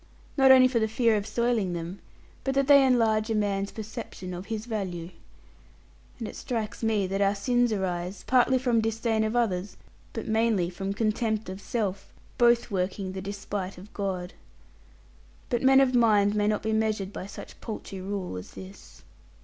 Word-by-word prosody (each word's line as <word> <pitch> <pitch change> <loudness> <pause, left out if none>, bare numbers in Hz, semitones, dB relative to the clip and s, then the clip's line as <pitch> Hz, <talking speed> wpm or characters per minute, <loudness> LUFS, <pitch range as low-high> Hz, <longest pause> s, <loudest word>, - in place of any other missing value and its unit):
Not 270 -2 +5
only 260 -1 +8
for 250 -2 +1
the 220 - +1
fear 225 0 +2
of 205 0 -2
soiling 225 -4 0
them, 170 +3 -5 0.4
but 270 0 -1
that 275 0 +3
they 280 0 +7
enlarge 225 -4 +3
a 225 - +1
man's 200 -1 0
perception 215 -4 -7
of 180 +2 -7
his 220 -1 -4
value. 185 -7 -4 1.1
And 225 - -5
it - - -8
strikes 225 -3 -4
me 220 -3 +1
that 195 +2 -2
our 200 0 +3
sins 245 +3 +1
arise, 185 -2 -3
partly 260 +1 +4
from 245 -3 +2
disdain 225 0 0
of 220 +2 -1
others, 205 -5 0 0.4
but 225 - -5
mainly 220 -5 +1
from 195 +2 -3
contempt 220 -1 -1
of 190 +1 -7
self, 200 -4 -3 0.3
both 235 -1 +4
working 190 0 -2
the 190 0 -5
despite 200 -1 -5
of 195 +4 -13
God. 185 -3 -3 1.2
But 240 -1 +1
men 270 0 +6
of 265 -1 +3
mind 210 -4 +4
may 210 -1 +1
not 210 -1 0
be 220 0 0
measured 215 -3 0
by 185 - -6
such 200 - -11
paltry 205 -4 -6
rule 190 - -4
as 95 +1 -9
this. 95 -10 -12
215 Hz, 175 wpm, -27 LUFS, 195-230 Hz, 1.2 s, only